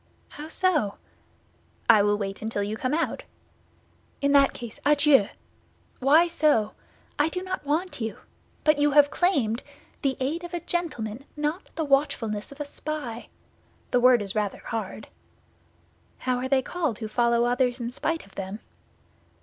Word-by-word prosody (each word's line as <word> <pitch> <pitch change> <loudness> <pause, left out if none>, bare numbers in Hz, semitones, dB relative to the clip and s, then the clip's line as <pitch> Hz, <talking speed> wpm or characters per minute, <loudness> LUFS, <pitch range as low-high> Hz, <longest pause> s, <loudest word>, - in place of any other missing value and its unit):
"How 300 +1 -8
so?" 320 - +1 0.9
"I 220 -3 +7
will 205 0 +2
wait 195 -1 -4
until 215 -2 -2
you 210 +2 -3
come 255 +6 -1
out." 330 - -1 1.0
"In 280 0 +1
that 280 -1 +6
case, 235 -2 -9
adieu." 285 -6 +5 0.7
"Why 295 +6 +5
so?" 300 -10 +2 0.5
"I 295 +2 +3
do 365 +3 -4
not 370 -6 -5
want 305 -1 -1
you." 225 -1 -3 0.5
"But 305 -1 +4
you 290 0 +3
have 290 0 +6
claimed—" 270 - +1 0.4
"The 270 -2 0
aid 300 +7 -2
of 345 0 -5
a - - -1
gentleman, 275 -9 -3
not 300 +5 -2
the 320 - -1
watchfulness 250 -7 0
of 280 - -12
a 295 - -3
spy." 285 -5 -6 0.6
"The 250 - +4
word 245 -3 +5
is 195 -1 -1
rather 210 -2 -2
hard." 220 -2 -5 1.1
"How 255 -1 -1
are 260 +1 -3
they 265 -1 +3
called 315 -10 -2
who 220 - -5
follow 235 +1 +2
others 245 0 +1
in 235 0 -3
spite 325 +5 -2
of 195 - -20
them?" 195 +2 -5
265 Hz, 160 wpm, -26 LUFS, 225-305 Hz, 1.1 s, I